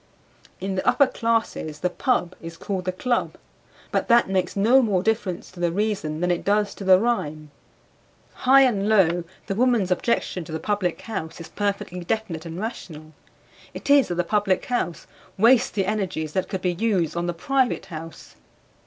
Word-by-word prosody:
In 195 +1 -3
the 185 - -3
upper 280 - +5
classes 225 - -2
the 180 - +1
"pub" 185 -5 0
is 165 0 -8
called 185 +1 -4
the 185 - 0
club, 240 +6 -1 0.6
but - - 0
that 235 0 +5
makes 185 -2 -1
no 230 +7 +5
more 200 -6 +1
difference 210 -5 -2
to 185 - -14
the 175 -1 +1
reason 190 -6 -2
than 180 0 +1
it 175 - -1
does 205 +1 +1
to - - -9
the 185 -1 +6
rhyme. 155 -10 -2 0.8
High 270 +2 +5
and 210 -5 +1
low, 175 -5 +3 0.2
the - - -2
woman's 230 -4 +2
objection 180 -2 0
to 155 - -10
the 160 - -3
Public 205 -4 -1
House 175 -9 -6
is 165 - -9
perfectly 200 -3 -3
definite 175 -4 -3
and 165 +2 -6
rational, 155 -8 -7 0.6
it - - -3
is 285 -2 +6
that 175 - -3
the 175 - +1
Public 200 +1 0
House 185 -9 -2 0.3
wastes 240 +4 +5
the 195 -2 -1
energies 185 -7 -2
that 190 - -1
could 190 -2 -4
be 180 -1 +1
used 185 -4 0
on 170 0 -2
the 175 - -1
private 260 +6 0
house. 165 -3 -10
190 Hz, 180 wpm, -24 LUFS, 175-220 Hz, 0.8 s, the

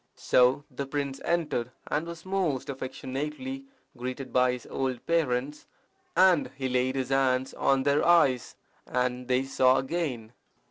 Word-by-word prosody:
So 125 +3 +3
the 135 +2 -5
prince 140 -1 -3
entered, 150 -8 0 0.2
and 155 +3 -2
was 170 0 -8
most 180 -9 -1
affectionately 150 - -5 0.3
greeted 130 +2 -6
by 125 0 +4
his 125 -2 -7
old 130 -3 -3
parents; 150 -3 0 0.5
and 185 -4 +5
he 135 -1 -2
laid 130 +1 +1
his 130 -1 -2
hands 130 -1 +1
on 135 -1 +2
their 140 +1 +2
eyes, 160 -8 +3 0.3
and 125 0 -1
they 125 +1 +2
saw 130 -1 +3
again. 130 -6 -3
135 Hz, 140 wpm, -28 LUFS, 125-150 Hz, 0.5 s, and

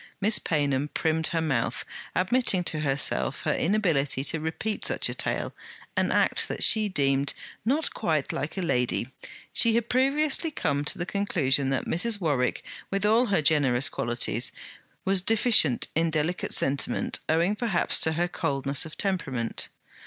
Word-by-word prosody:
Miss 210 +2 +4
Paynham 145 -3 0
primmed 160 +1 0
her 165 - -1
mouth, 135 -8 -1 0.3
admitting 190 -1 +2
to 155 -2 +1
herself 140 0 0
her 150 - +1
inability 160 -9 0
to 160 +3 +1
repeat 160 +7 -4
such - - +2
a - - -3
tale; - - -2 0.4
an - - +1
act - - +2
that - - -2
she 215 -2 +4
deemed 140 -4 0 0.3
not 285 +8 0
'quite 155 -4 -1
like 150 +6 -4
a 190 - -1
lady.' 125 -5 0 0.4
She 230 -1 +4
had 235 0 -1
previously 285 +5 +1
come 145 - -2
to - - -1
the 175 - -3
conclusion 145 -9 0
that 135 - -1
Mrs. 210 +5 +1
Warwick, 145 -8 -1 0.3
with 195 +1 -1
all 230 +4 +3
her 195 -7 +1
generous 140 -4 +3
qualities, 120 0 -1 0.5
was 195 -1 +2
deficient 215 - +3
in 165 +1 +1
delicate 160 +3 -2
sentiment 140 +1 0
owing 170 +6 +2
perhaps 210 -5 +1
to 160 - +2
her 175 +2 0
coldness 140 -2 -1
of 155 - -12
temperament. 135 - -1
160 Hz, 155 wpm, -26 LUFS, 140-205 Hz, 0.5 s, Miss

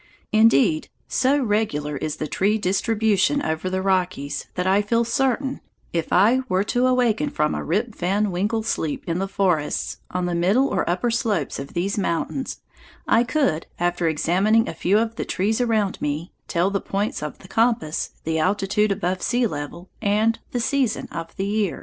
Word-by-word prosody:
Indeed, 220 -6 +4 0.2
so 270 +2 +2
regular 205 - 0
is 150 +2 -3
the - - -4
tree 200 +7 +1
distribution 215 +5 +1
over 160 +3 -2
the 185 0 -2
Rockies 175 -7 -1
that 180 - -1
I 195 +2 +4
feel 230 +3 +1
certain, 265 +2 0 0.3
if 165 -2 -2
I 235 +5 +5
were 185 +1 +2
to 245 +1 +3
awaken 250 +1 +2
from 150 - 0
a - - -3
Rip 215 +7 -1
Van 200 +3 0
Winkle 210 +5 -1
sleep 160 -8 -2
in 170 +1 -1
the 195 - -1
forests 180 -7 0
on 180 0 -2
the 175 - -1
middle 195 +11 +3
or - - -1
upper 185 +7 0
slopes 215 - -1
of 140 - -8
these 195 +4 0
mountains, 195 +9 -2 0.5
I 230 - +4
could, 250 - 0
after 175 -1 0
examining 190 +8 +2
a - - -4
few 185 +5 +2
of 225 0 -1
the - - -1
trees 215 +5 0
around 220 -5 0
me, 150 +4 -2 0.2
tell 175 +3 +1
the 200 - -1
points 200 -2 -2
of 150 -1 -5
the 190 - -15
compass, 225 -7 +1
the 160 0 -1
altitude 200 +4 +1
above 185 -2 -1
sea 245 0 +1
level, 170 0 -5
and 220 +2 +2
the 245 - -2
season 250 -1 0
of 165 0 -6
the 195 - -2
year. 205 -2 -1
200 Hz, 180 wpm, -23 LUFS, 175-225 Hz, 0.5 s, I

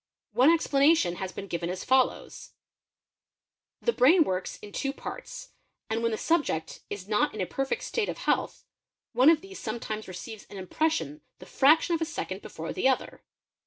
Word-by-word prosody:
One 255 +5 +5
anation 280 - +3
has 190 -1 -4
been 195 - -7
given 170 -2 -3
as 185 +1 -4
follows:—the 265 - -4
brain 325 - +6
works 185 -7 -3
in 205 - -11
two 275 +6 -2
parts - - -8 0.4
I 220 - +1
when 230 0 +1
the 220 - -2
subject 295 - 0
is 195 -2 -6
not 210 0 +1
in - - -6
a - - 0
perfect 270 +7 -2
state 455 -3 -1
of - - -4
health - - -1 0.5
one 255 +5 +6
of 320 -2 +4
these 390 0 -10
netimes 215 -1 -4
receives 205 +4 -8
an 200 - -9
impression 310 - -1 0.2
the - - -13
fraction 310 +5 +4
of 330 - 0
a - - +2
second 205 - -5
before 165 +1 -6
the 265 - +2
other. 265 - -2
250 Hz, 170 wpm, -28 LUFS, 195-315 Hz, 0.5 s, brain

